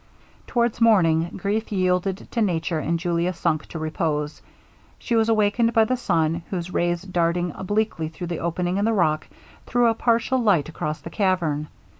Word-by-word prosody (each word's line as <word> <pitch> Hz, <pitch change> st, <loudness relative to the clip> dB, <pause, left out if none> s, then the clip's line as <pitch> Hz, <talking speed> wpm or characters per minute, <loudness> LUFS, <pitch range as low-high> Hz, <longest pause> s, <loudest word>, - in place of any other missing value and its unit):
Towards 235 Hz, -1 st, 0 dB
morning 170 Hz, -7 st, +4 dB
grief 210 Hz, +4 st, -2 dB
yielded 185 Hz, 0 st, 0 dB
to 230 Hz, -, -1 dB
nature, 170 Hz, -4 st, 0 dB
and 170 Hz, +3 st, 0 dB
Julia 175 Hz, +1 st, 0 dB
sunk 155 Hz, -2 st, -1 dB
to -, -, -7 dB
repose. 155 Hz, -1 st, -2 dB, 0.6 s
She 235 Hz, -, -2 dB
was 225 Hz, 0 st, +3 dB
awakened 225 Hz, +2 st, +2 dB
by 225 Hz, -1 st, +5 dB
the 255 Hz, -, 0 dB
sun, 165 Hz, -7 st, 0 dB
whose 180 Hz, -1 st, -4 dB
rays 175 Hz, 0 st, 0 dB
darting 175 Hz, -1 st, 0 dB
obliquely 205 Hz, -4 st, -1 dB
through 160 Hz, +2 st, -7 dB
the 170 Hz, -1 st, -4 dB
opening 175 Hz, +2 st, -1 dB
in 200 Hz, -, +1 dB
the 225 Hz, -, +2 dB
rock, 155 Hz, -6 st, +1 dB, 0.4 s
threw 245 Hz, -1 st, +2 dB
a 230 Hz, -, +4 dB
partial 235 Hz, +3 st, +1 dB
light 200 Hz, -, +3 dB
across 155 Hz, -1 st, -4 dB
the -, -, -9 dB
cavern. 170 Hz, -7 st, 0 dB
180 Hz, 170 wpm, -23 LUFS, 165-220 Hz, 0.6 s, by